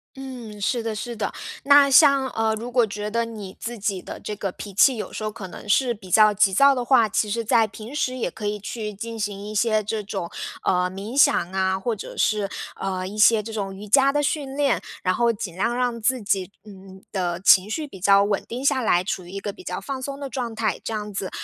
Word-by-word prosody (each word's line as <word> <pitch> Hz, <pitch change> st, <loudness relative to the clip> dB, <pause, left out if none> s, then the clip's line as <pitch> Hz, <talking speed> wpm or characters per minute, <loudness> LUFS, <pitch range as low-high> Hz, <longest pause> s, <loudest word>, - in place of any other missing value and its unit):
嗯， 250 Hz, -6 st, -8 dB
是 235 Hz, +4 st, 0 dB
的 225 Hz, -1 st, -3 dB
是 235 Hz, +2 st, -5 dB
的， 210 Hz, -2 st, -2 dB, 0.3 s
那 280 Hz, 0 st, +6 dB
像， 275 Hz, -1 st, +6 dB
呃， 220 Hz, -2 st, 0 dB
如 235 Hz, +3 st, -6 dB
果 240 Hz, -3 st, +3 dB
觉 210 Hz, +1 st, -5 dB
得 230 Hz, 0 st, +1 dB
你 210 Hz, -4 st, -8 dB
自 240 Hz, +1 st, -5 dB
己 200 Hz, -3 st, -2 dB
的 -, -, -8 dB
这 210 Hz, -, -5 dB
个 195 Hz, -2 st, -3 dB
脾 200 Hz, +1 st, -9 dB
气 255 Hz, +6 st, +5 dB
有 210 Hz, -, -6 dB
时 215 Hz, -, -5 dB
候 215 Hz, -, -1 dB
可 205 Hz, -3 st, -8 dB
能 180 Hz, -, -11 dB
是 245 Hz, +2 st, +3 dB
比 190 Hz, -4 st, -13 dB
较 215 Hz, +2 st, +6 dB
急 200 Hz, -1 st, +3 dB
躁 275 Hz, +3 st, +6 dB
的 250 Hz, -2 st, -2 dB
话， 240 Hz, -3 st, +4 dB
其 210 Hz, +1 st, 0 dB
实 230 Hz, +2 st, -1 dB
在 225 Hz, 0 st, +4 dB
平 220 Hz, +5 st, -10 dB
时 255 Hz, -3 st, -1 dB
也 205 Hz, -8 st, -2 dB
可 210 Hz, -, -5 dB
以 210 Hz, 0 st, -2 dB
去 210 Hz, +1 st, -5 dB
进 225 Hz, +2 st, -7 dB
行 205 Hz, -1 st, -4 dB
一 215 Hz, -, -6 dB
些 215 Hz, 0 st, +2 dB
这 215 Hz, +1 st, -3 dB
种， 195 Hz, -4 st, -5 dB, 0.3 s
呃， 180 Hz, 0 st, +2 dB
冥 200 Hz, +6 st, -7 dB
想 230 Hz, -10 st, +4 dB
啊， 190 Hz, 0 st, 0 dB
或 225 Hz, +3 st, -2 dB
者 200 Hz, -, -9 dB
是， 210 Hz, -2 st, +1 dB, 0.3 s
呃， 185 Hz, -1 st, -3 dB
一 205 Hz, -, -8 dB
些 215 Hz, 0 st, +5 dB
这 225 Hz, -, -7 dB
种 195 Hz, -3 st, -4 dB
瑜 205 Hz, +2 st, -9 dB
伽 275 Hz, +5 st, +5 dB
的 290 Hz, 0 st, 0 dB
训 275 Hz, -2 st, -2 dB
练。 280 Hz, -4 st, +2 dB, 0.2 s
然 185 Hz, -, +2 dB
后 235 Hz, +3 st, +2 dB
尽 200 Hz, -6 st, -6 dB
量 230 Hz, +5 st, 0 dB
让 245 Hz, -2 st, -1 dB
自 255 Hz, +3 st, +1 dB
己， 195 Hz, -2 st, -1 dB
嗯， 190 Hz, -2 st, -13 dB
的 175 Hz, -3 st, -2 dB
情 195 Hz, +1 st, +5 dB
绪 305 Hz, +6 st, -3 dB
比 190 Hz, -, -12 dB
较 200 Hz, +1 st, +5 dB
稳 205 Hz, -1 st, 0 dB
定 250 Hz, +3 st, -5 dB
下 275 Hz, -2 st, +3 dB
来， 180 Hz, -5 st, +2 dB
处 185 Hz, -1 st, -3 dB
于 -, -, -12 dB
一 195 Hz, -, -5 dB
个 200 Hz, 0 st, -5 dB
比 370 Hz, -, -14 dB
较 -, -, -4 dB
放 270 Hz, -2 st, -5 dB
松 275 Hz, +1 st, -5 dB
的 280 Hz, -, -4 dB
状 245 Hz, -3 st, -4 dB
态。 220 Hz, -1 st, -1 dB
这 -, -, -4 dB
样 210 Hz, -1 st, -4 dB
子， 190 Hz, -1 st, -3 dB
215 Hz, 265 characters per minute, -23 LUFS, 195-240 Hz, 0.3 s, 那